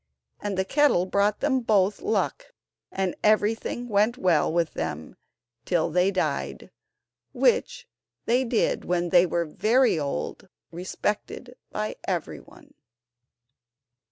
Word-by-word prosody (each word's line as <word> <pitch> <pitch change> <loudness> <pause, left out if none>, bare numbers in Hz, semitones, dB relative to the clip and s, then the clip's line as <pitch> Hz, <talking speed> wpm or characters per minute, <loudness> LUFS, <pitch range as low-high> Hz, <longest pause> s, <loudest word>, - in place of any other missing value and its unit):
And 205 -2 -4
the 190 - +1
kettle 285 -7 +3
brought 200 +2 +1
them 275 -2 +2
both 210 -4 +1
luck, 415 +3 -2 0.4
and 190 -2 -1
everything 215 +3 +1
went 215 +2 +2
well 170 -8 +2
with 170 -1 0
them 80 -1 -5 0.5
till 175 -3 0
they 180 +3 +3
died, 190 -2 -3 0.6
which - - +1 0.4
they 245 +3 +2
did 235 -2 0
when 175 0 -1
they 175 +1 +5
were 170 0 -1
very 220 +5 +2
old, 140 - -4 0.2
respected 210 +7 -4
by 215 0 -4
everyone. 285 -3 -6
200 Hz, 115 wpm, -25 LUFS, 175-240 Hz, 0.6 s, they